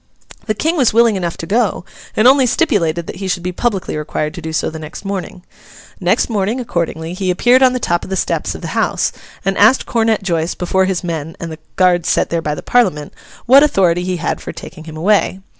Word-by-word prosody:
The 215 - 0
King 320 +10 0
was 250 -6 +2
willing 230 -2 +5
enough 175 -3 -3
to - - -6
go, 210 -2 0 0.3
and 215 - +5
only 265 -1 +5
stipulated 175 - +1
that - - -7
he 195 0 -4
should 180 -2 -2
be 180 - -2
publicly 195 0 -2
required 150 0 -3
to 175 - -8
do 160 0 -5
so 160 - 0
next 160 +4 -9
morning. 190 -2 -5 0.6
Next - - +1
morning, 215 +2 -1
accordingly, 170 -7 -3
he 185 0 -2
appeared 245 +8 +4
on 255 -1 +5
the 255 - -1
top 175 -6 0
of - - -8
the 190 - -1
steps - - -1
of - - -9
the - - -5
house, - - 0 0.3
and 195 0 +1
asked 220 +6 +5
Comet 225 -3 +1
Joice 170 -2 -1
before 190 +1 +1
his 185 -1 -2
men 165 -2 -4
and 165 -1 -6
the 160 - -8 0.2
guard 180 -2 +3
set - - +1
there 170 -1 0
by 150 -2 -2
the - - -8
Parliament, 185 -12 +1 0.3
what 270 +3 +7
authority 185 - +2
he 180 0 -2
had - - -3
for - - -6
taking 160 - -10
him 160 -1 -9
away? 195 +2 +2
185 Hz, 225 wpm, -17 LUFS, 170-225 Hz, 0.6 s, what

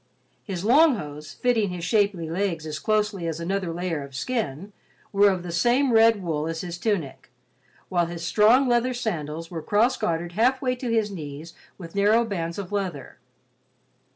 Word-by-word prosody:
His 195 -2 -5
long 290 +5 +6
hose, 150 -5 -7
fitting 230 -5 +1
his 180 -1 -6
shapely 200 -5 +1
legs 170 -1 -2
as 155 -1 -5
closely 210 -2 0
as 165 -1 -3
another 185 +1 -2
layer 170 -2 -3
of 140 -1 -10
skin, 200 - -3 0.4
were 200 +1 +6
of 185 -3 -2
the 175 - -6
same 240 +9 +2
red 225 -2 +5
wool 155 -3 -2
as 165 0 -3
his 175 -1 -6
tunic, 180 - -2 0.6
while 175 -2 +1
his 170 -1 -6
strong 225 +8 +4
leather 245 +1 +2
sandals 165 -8 -4
were 165 -2 -4
cross 225 +7 +2
gartered 170 -5 -2
halfway 255 +6 +1
to 250 -1 -5
his 220 -2 +1
knees 155 -2 -8 0.2
with 165 -3 -10
narrow 210 +4 +3
bands 170 -6 -4
of 200 -2 -6
leather. 185 -10 -4
190 Hz, 170 wpm, -25 LUFS, 165-220 Hz, 0.6 s, long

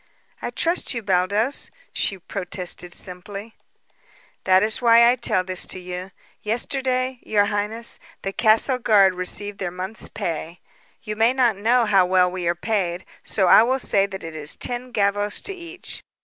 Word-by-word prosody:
"I - - -3
trust 335 -5 -1
you, 230 - -4
Baldos," 200 +7 0 0.2
she 195 - 0
protested 180 -1 -2
simply. 195 +5 -6 0.9
"That 190 0 +5
is 220 +2 0
why 235 0 +6
I - - +1
tell 230 -6 +1
this 185 0 0
to 185 - -4
you. 180 +1 -6 0.3
Yesterday, 255 +2 -1
your 205 -1 +2
highness, 215 +3 -2 0.2
the 195 - -3
castle 225 +5 +3
guard 200 -5 +4
received 200 +3 -2
their 185 - -2
month's 185 +4 -5
pay. 170 -4 -5 0.4
You 215 -1 -4
may 225 +3 +3
not 245 -5 +2
know 230 +4 +2
how 195 -4 +4
well 180 -1 +3
we 180 -2 -4
are 170 - +1
paid, 180 -2 -2 0.2
so 195 - 0
I 180 - +8
will 255 +3 +2
say 200 -6 +2
that 190 -1 -8
it 165 -1 -7
is 150 -1 +1
ten 250 +1 -2
gavvos 205 -1 0
to 395 - -4
each. 355 0 -6
205 Hz, 165 wpm, -22 LUFS, 185-235 Hz, 0.9 s, I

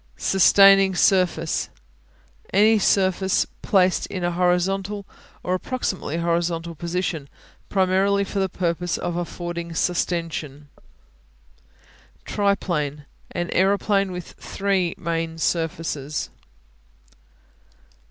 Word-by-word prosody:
Sustaining 195 0 +5
Surface 175 -4 +2 0.8
Any 215 +3 +5
surface 190 -1 +2 0.2
placed 185 -2 +2
in 185 - -5
a 175 - +1
horizontal 190 +3 0 0.4
or 180 - -1
approximately 185 - -3
horizontal 170 0 -1
position, 170 -3 -3 0.4
primarily 195 +1 +2
for 200 0 -4
the 190 -1 0
purpose 175 -1 -2
of 175 -1 -3
affording 175 -1 -5
sustension. 165 -4 -2 1.6
Triplane 170 -8 -1 0.2
An 175 -1 -4
aeroplane 195 +1 +2
with 180 -2 -7
three 195 -3 -1
main 165 -1 -3
surfaces. 160 -3 -2
180 Hz, 85 wpm, -23 LUFS, 170-195 Hz, 1.6 s, Sustaining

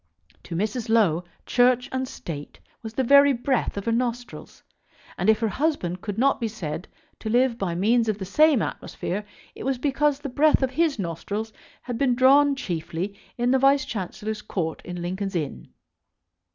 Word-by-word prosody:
To 170 - -6
Mrs. 215 +5 -2
Low, 185 -7 +3 0.2
Church 250 0 +3
and 260 0 -2
State 145 - -8 0.2
was 220 -1 -8
the 265 - +1
very 280 +2 +6
breath 250 -2 -1
of 200 - -4
her 230 - +1
nostrils; 245 +1 -3 0.5
and - - 0
if 220 - +5
her 225 - +2
husband 210 - -1
could 205 -1 -5
not 270 +2 +2
be 230 - +1
said 180 -5 -5 0.3
to 220 - -4
live 245 +1 +2
by 180 -4 -2
means 225 +5 +2
of 210 - 0
the 190 - -5
same 300 +5 +4
atmosphere 200 +4 -4 0.3
it - - -9
was 270 0 0
because 285 +1 +1
the 290 - -5
breath 290 +2 +3
of 260 - 0
his 320 -3 +1
nostrils 205 +4 -4 0.3
had 245 -2 -5
been 260 -3 +2
drawn 275 +3 +5
chiefly 175 -3 -4 0.2
in 245 +1 +1
the 265 - +4
Vice 275 +1 +4
Chancellor's 210 +1 -4
Court 175 -6 -3
in 175 -1 -6
Lincoln's 190 +2 -3
Inn. 150 -5 -3
230 Hz, 180 wpm, -25 LUFS, 195-265 Hz, 0.5 s, very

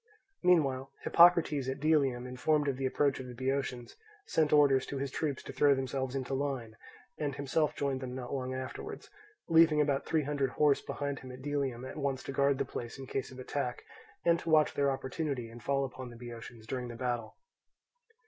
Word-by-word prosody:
Meanwhile 140 -7 +3
Hippocrates 170 -6 +5
at 135 +1 -3
Delium, 140 -5 +2
informed 145 +4 +1
of 135 -2 0
the 135 0 0
approach 140 +1 +1
of 130 - -6
the 125 - -8
Boeotians, 130 -1 -2 0.3
sent 155 -2 +1
orders 140 -3 +5
to 140 - -4
his 135 0 -3
troops 145 -3 -2
to - - -8
throw 145 -1 +5
themselves 130 0 -2
into 135 0 -3
line, 135 -5 -2 0.4
and 145 -3 -1
himself 145 +2 0
joined 135 -2 -1
them 125 -1 -5
not 125 0 -5
long 130 -1 -2
afterwards, 130 0 -6 0.4
leaving 165 -2 +6
about 140 -2 +1
three 160 -2 +2
hundred 140 -1 0
horse 145 +2 +3
behind 145 -1 -3
him 130 - -9
at 130 +1 -10
Delium, 135 -4 -2
at 130 - -7
once 140 -3 -1
to - - -5
guard 140 0 +2
the - - 0
place 120 -1 -6
in 135 - -7
case 135 0 -3
of 130 - -11
attack, 130 -1 -3 0.4
and 170 0 +4
to 165 - -5
watch 155 -1 +5
their 140 0 +2
opportunity 135 -2 -3
and 120 +1 -11
fall 140 0 +1
upon 130 -1 -7
the 120 - -11
Boeotians 115 -1 -9
during 125 +1 -3
the 120 - -7
battle. 120 -2 -3
135 Hz, 195 wpm, -32 LUFS, 130-145 Hz, 0.4 s, leaving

